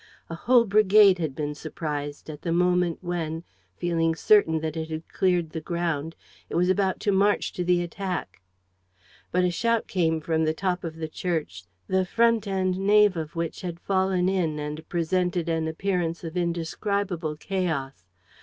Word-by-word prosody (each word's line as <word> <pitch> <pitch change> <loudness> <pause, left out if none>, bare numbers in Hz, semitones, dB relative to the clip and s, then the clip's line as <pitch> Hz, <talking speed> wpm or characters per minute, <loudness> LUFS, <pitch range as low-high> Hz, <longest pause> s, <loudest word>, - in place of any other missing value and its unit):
A - - -3
whole 240 +6 +4
brigade 205 -2 +5
had 155 -5 -2
been 150 -1 -3
surprised 150 -1 -5
at 150 -2 -8
the 170 - -2
moment, 180 0 +2
when, 165 -2 -3 0.3
feeling 165 -2 +1
certain 165 -4 +4
that 160 0 -3
it 160 0 -4
had 160 0 -5
cleared 180 -4 +1
the 160 - -5
ground, 165 -2 -2 0.3
it - - -5
was 180 +2 +2
about 190 -1 +1
to 205 - +1
march 200 +2 +2
to 180 - -2
the 175 0 +2
attack. 180 - -5 0.9
But 180 0 +2
a 180 - +2
shout 230 +5 +1
came 165 -4 0
from 160 0 0
the 155 0 +1
top 180 0 -1
of 165 -2 -5
the 160 -1 -4
church, 155 - -3 0.2
the 190 0 +1
front 230 +2 +2
and 185 -1 0
nave 205 0 +5
of 160 -1 -5
which 165 -1 -3
had 175 -3 -5
fallen 190 -1 +1
in 175 -5 0
and 150 +1 -6
presented 175 0 0
an 165 -1 0
appearance 170 0 -2
of 165 0 -6
indescribable 175 0 -2
chaos. 150 - -3
175 Hz, 170 wpm, -26 LUFS, 160-190 Hz, 0.9 s, brigade